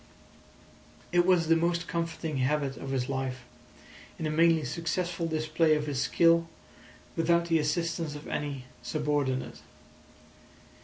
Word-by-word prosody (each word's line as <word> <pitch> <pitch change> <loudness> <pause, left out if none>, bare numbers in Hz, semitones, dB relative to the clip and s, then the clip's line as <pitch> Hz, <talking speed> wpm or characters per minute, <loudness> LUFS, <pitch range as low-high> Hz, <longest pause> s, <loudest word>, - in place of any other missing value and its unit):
It 175 0 +3
was 180 -3 +4
the 165 - +5
most 170 +1 0
comforting 165 -2 -3
habit 135 +1 0
of 135 - -7
his 130 -2 -1
life, 130 -2 -3 0.7
in 160 - -4
a 155 - 0
mainly 165 0 +4
successful 170 0 -2
display 155 0 +2
of 150 0 -1
his 140 -3 -2
skill 165 +2 +4 0.7
without 170 +1 +2
the 165 -1 +4
assistance 165 0 -1
of 150 - -9
any 140 -3 -3 0.2
subordinate. 145 -4 -1
155 Hz, 125 wpm, -29 LUFS, 145-170 Hz, 0.7 s, the